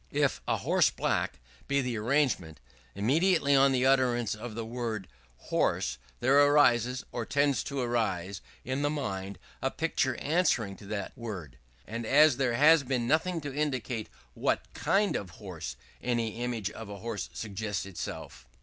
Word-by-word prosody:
If - - +1
"a - - +2
horse - - +3
black" - - -1 0.3
be 140 0 +2
the 125 -3 -1
arrangement, 115 - 0 0.4
immediately 140 - +3
on 135 0 +6
the 130 -1 +2
utterance 125 -4 +3
of 110 +1 -7
the 115 -1 -4
word 115 -4 -4 0.3
"horse," - - 0 0.2
there 135 +3 +5
arises, 130 -4 +4
or 120 - -3
tends 140 +3 +1
to 140 -1 -3
arise, 100 -6 -1 0.2
in 130 +2 -1
the 145 - +2
mind, 100 -10 -3 0.2
a 135 - +1
picture 140 -4 0
answering 140 - +1
to 100 - -12
that 100 -2 -4
word; 95 - -7 0.3
and 115 +5 -5
as 145 0 +6
there 130 -3 +1
has, 150 +5 +6
been 125 -3 -1
nothing 165 +4 +1
to 145 -2 -5
indicate 130 -6 -2 0.2
what - - -1
kind 200 +1 +1
of 95 - -3
horse, - - -7 0.3
any 120 -2 -1
image 115 -5 -2
of 110 -1 -9
a 100 - -7
horse 110 -1 -4
suggests 105 -2 -4
itself. - - -7
120 Hz, 160 wpm, -29 LUFS, 105-140 Hz, 0.4 s, on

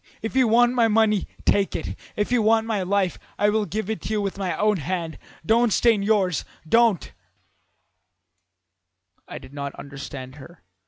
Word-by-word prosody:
If 225 - -4
you 260 -2 +4
want 240 +2 +4
my 235 -2 +3
money, 215 -2 +2 0.2
take 200 -1 +2
it; - - -4 0.2
if 210 +3 -1
you 245 -2 +3
want 220 +1 +3
my 220 -3 -1
life, 190 0 0 0.2
I 205 - +3
will 215 0 +1
give 215 +1 -3
it 220 0 -3
to - - -6
you 215 - +1
with 200 -2 -2
my 190 -2 -3
own 210 -1 +2
hand. 165 0 -4 0.3
Don't 230 +4 +3
stain 225 -1 +3
yours 200 -4 +1 0.2
don't 230 -1 +3 1.0
' 90 +1 -50
"I - - -7
did 130 +1 -13
not 140 -1 -5
understand 140 -1 -9
her. 165 +5 -14
200 Hz, 175 wpm, -23 LUFS, 145-220 Hz, 1.0 s, you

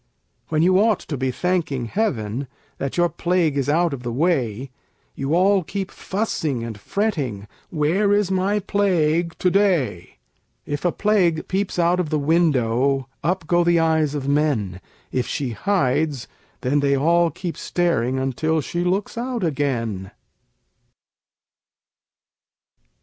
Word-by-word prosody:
When 155 0 +2
you 185 +2 +4
ought 215 -1 +3
to 150 - -5
be 130 0 -1
thanking 155 -4 -1
heaven 125 - -2 0.3
That 140 +3 -3
your 175 0 +4
Plague 170 -3 0
is 140 0 0
out 165 +1 +2
of 135 - -5
the 120 -1 -4
way, 130 - 0 0.4
You 135 +4 -1
all 190 +1 +4
keep 195 +3 -4
fussing 160 - -2
and 115 -2 -5
fretting 135 - -2 0.2
"Where 175 +6 +1
is 205 -2 +2
my 190 +2 +1
Plague 175 -5 +1
to 180 - +1
day?" 170 - +1 0.5
If 145 +3 -4
a 175 - +3
Plague 185 -7 +1
peeps 195 0 -2
out 175 +1 +2
of 175 -4 -1
the 155 - +1
window, 140 -4 +1
Up 175 +2 0
go 175 +2 +3
the 170 0 +3
eyes 160 -2 +2
of 140 -2 -3
men; 135 -11 0 0.3
If 125 - -1
she 135 -4 -2
hides, 145 - 0 0.3
then 135 +3 +1
they 140 -1 +2
all 170 +4 +3
keep 175 0 -5
staring 150 -8 0
Until 135 +5 0
she 175 +4 -2
looks 195 +5 -1
out 245 -3 -3
again. 120 - -1
160 Hz, 140 wpm, -22 LUFS, 135-180 Hz, 0.5 s, you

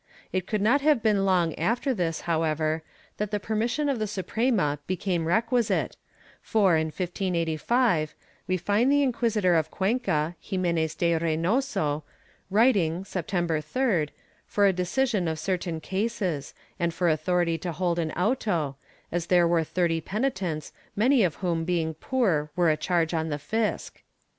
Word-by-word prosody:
It 185 -1 -1
could 210 -2 -1
not 255 +7 +4
have 290 -5 +3
been 205 -3 +3
long 175 -4 +2
after 240 - +1
this, 170 -7 -2
however, 160 -1 0 0.4
that 210 -1 -2
the 210 0 -1
permission 230 +8 -1
of 275 -4 0
the 215 - -1
Suprema 195 - 0
became 180 -2 -1
requisite 230 +5 +1 0.5
for, 200 -6 +3
in 160 0 +1
1585, 175 - 0 0.3
we 185 - +1
find 205 +8 +2
the 285 0 +4
Inquisitor 225 -7 +1
of 160 -2 +2
Cuenca, 185 -7 0
Ximenes 170 -5 -1
de 170 -1 +1
Reynoso, 165 - 0 0.5
writing, 195 -6 +3
Septem 180 -1 -2
ber 160 -2 0
3d, 175 - 0 0.4
for 205 - +2
a 195 - +4
decision 185 +2 0
of 160 -1 -1
certain 175 0 -2
cases, 190 -6 -2 0.2
and 170 -1 0
for 175 - +1
authority 165 +1 +1
to 175 - -3
hold 175 +1 -1
an 160 -2 -1
auto, 180 - 0 0.3
as 175 0 -2
there 175 -2 +4
were 170 -1 +2
thirty 165 0 0
penitents, 190 - -2 0.2
many 245 +3 +4
of 170 -5 +1
whom 170 -3 -1
being 165 -2 0
poor 160 - 0
were 175 -3 +3
a - - +2
charge 165 +1 0
on 160 -1 -1
the 145 - -2
fisc. 220 +9 -2
180 Hz, 155 wpm, -26 LUFS, 160-215 Hz, 0.5 s, not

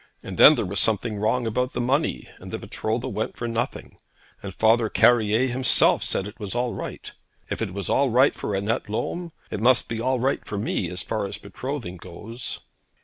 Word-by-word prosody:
And - - -7
then - - +10
there - - -1
was 95 +1 -1
something 110 +1 +1
wrong 115 +4 +1
about 125 +4 -1
the - - -3
money; 135 +5 0
and - - -10
the - - -3
betrothal 110 +2 -3
went 110 - -3
for 120 - -3
nothing, 115 0 -4 0.4
and 100 - -6
Father 110 +3 +3
Carrier 115 +1 +4
himself 130 -1 +3
said 95 - -1
it 105 - -11
was 105 0 -5
all 120 0 0
right. - - -7 0.4
If - - -3
it 110 -5 -2
was 100 0 -4
all 140 -1 +2
right 130 +4 +4
for 100 - -3
Annette 105 +4 -1
Lolme, 170 +10 -3 0.2
it - - -3
must 125 +1 +4
be 115 -1 -3
all 130 +1 +1
right 135 +3 0
for 105 - -5
me 100 -4 -1
as 90 +2 -4
far 110 -3 -2
as - - -5
betrothing 110 -2 -6
goes.' 105 +8 -6
115 Hz, 205 wpm, -24 LUFS, 105-125 Hz, 0.4 s, then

